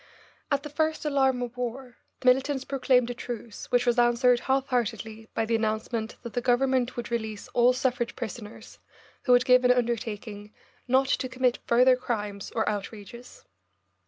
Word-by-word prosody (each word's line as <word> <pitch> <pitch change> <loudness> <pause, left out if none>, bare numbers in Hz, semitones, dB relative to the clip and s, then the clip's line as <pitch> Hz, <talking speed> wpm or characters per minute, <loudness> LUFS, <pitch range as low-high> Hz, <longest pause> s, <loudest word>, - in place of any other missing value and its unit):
At 280 -1 0
the 300 - -6
first 315 +1 -1
alarm 265 -4 +2
of 240 0 -6
war 250 +1 -5 0.2
the - - -12
militants 265 +2 +3
proclaimed 255 -3 +2
a - - -3
truce, 235 -2 -7
which 245 -1 +2
was 240 0 +2
answered 240 +1 +4
half 265 +2 0
heartedly 225 -2 -3
by 225 - +1
the 230 - -2
announcement 220 +1 -2
that 235 - -7
the 245 - -1
Government 250 0 +1
would 240 0 -5
release 220 -3 -3
all 240 +1 +4
suffrage 250 -2 -1
prisoners 220 -2 -8 0.5
who 250 - +2
would 245 0 +5
give 250 0 +5
an 250 - +4
undertaking 225 -3 -2 0.3
"not 260 +2 +3
to 260 -1 0
commit 255 -1 0
further 250 +2 +5
crimes 210 -5 -4
or 220 - 0
outrages." 210 +3 -6
245 Hz, 165 wpm, -27 LUFS, 225-255 Hz, 0.5 s, would